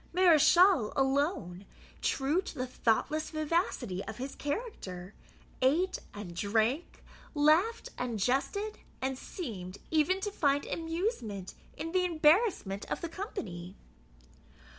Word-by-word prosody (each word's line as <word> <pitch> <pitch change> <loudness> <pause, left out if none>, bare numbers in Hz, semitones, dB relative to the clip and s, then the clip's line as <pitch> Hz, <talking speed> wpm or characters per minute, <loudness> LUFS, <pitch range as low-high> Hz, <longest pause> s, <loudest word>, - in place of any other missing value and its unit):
Mareschal 350 - +6
alone, 270 - 0 0.3
true 285 +7 +1
to - - -8
the 255 - -1
thoughtless 260 +5 0
vivacity 305 - -1
of - - -7
his 265 +2 -5
character, 210 - -5 0.5
ate 325 +9 +2
and 205 -4 -8
drank, 220 - 0 0.3
laughed 320 +10 +3
and 245 -3 -2
jested, 280 - 0 0.2
and 265 0 -1
seemed 200 - -6
even 320 +4 +3
to 410 - -2
find 285 -6 +1
amusement 325 - -3 0.2
in 330 - -4
the 365 +1 +2
embarrassment 320 - +3
of - - -2
the 340 - -3
company. 195 - -6
285 Hz, 115 wpm, -31 LUFS, 220-350 Hz, 0.5 s, Mareschal